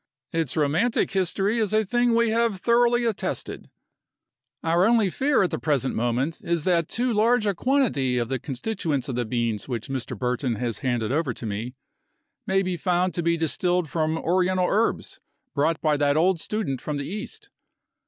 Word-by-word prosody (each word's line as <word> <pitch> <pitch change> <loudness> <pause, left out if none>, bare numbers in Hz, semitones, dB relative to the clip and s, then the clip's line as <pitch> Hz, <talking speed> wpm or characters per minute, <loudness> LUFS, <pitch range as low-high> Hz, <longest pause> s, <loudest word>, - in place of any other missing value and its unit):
Its 160 -5 -1
romantic 160 +11 +1
history 195 +4 0
is 215 -2 0
a 215 0 +3
thing 240 +2 +2
we 230 -1 +3
have 230 -3 +1
thoroughly 240 +3 +3
attested. 225 -4 -3 0.9
Our 170 +2 +3
only 225 -5 +3
fear 275 0 +2
at 180 - 0
the - - -2
present 140 -4 0
moment 120 +7 -1
is 170 -2 -1
that 170 -2 +2
too 245 0 -1
large 220 +2 +3
a 200 - +2
quantity 195 - +1
of 120 -1 0
the 130 +1 -2
constituents 140 - -3
of - - -2
the 120 0 -1
beans 115 -2 -2
which 120 0 -4
Mr. 135 -2 -4
Burton 125 -1 -1
has 115 -1 -3
handed 120 -4 -1
over 140 -5 0
to - - -8
me, 110 +5 -4 0.7
may 195 0 +2
be 180 -1 -2
found 180 +1 +1
to 175 - -1
be 170 0 +1
distilled 170 0 0
from 160 -1 0
Oriental 180 +2 +1
herbs 220 +3 0 0.3
brought 155 +2 +1
by 155 -2 +2
that 145 0 +2
old 175 +2 +3
student 160 - -3
from 150 -1 -3
the 140 - -4
East. 400 - -6
170 Hz, 180 wpm, -25 LUFS, 135-210 Hz, 0.9 s, a